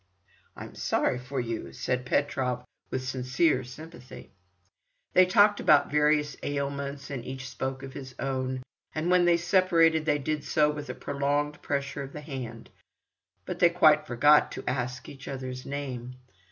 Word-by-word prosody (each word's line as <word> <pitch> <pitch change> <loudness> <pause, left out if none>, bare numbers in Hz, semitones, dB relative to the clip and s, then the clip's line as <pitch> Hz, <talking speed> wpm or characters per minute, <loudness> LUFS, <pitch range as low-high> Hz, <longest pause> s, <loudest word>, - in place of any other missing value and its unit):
"I'm - - -8
sorry 125 - 0
for 130 +2 -4
you," 115 -2 -4
said 125 0 -2
Petrov 125 -3 0 0.2
with 130 0 -3
sincere 130 +2 +1
sympathy. 130 -1 -11 0.8
They 185 0 +6
talked 205 +2 +5
about - - +4
various 150 -1 +2
ailments, 140 0 -3
and 130 -4 -4
each 130 +1 -6
spoke 130 +2 -4
of 135 -1 -8
his 130 -2 -9
own, 130 -1 -2 0.3
and 160 +3 0
when 180 -1 +5
they 170 -1 +5
separated 170 -3 +3
they 150 -2 +2
did 150 +1 -2
so 150 -1 +2
with 150 -1 -7
a - - -4
prolonged 145 +1 -1
pressure 140 0 -2
of 135 0 -7
the 150 - -7
hand, 130 -6 -7 0.7
but - - -5
they 175 - +6
quite 155 -3 +4
forgot 145 +5 +5
to - - -8
ask 125 0 -2
each 135 -1 -11
other's 130 -1 -6
name. 130 -3 -5
140 Hz, 155 wpm, -28 LUFS, 130-150 Hz, 0.8 s, They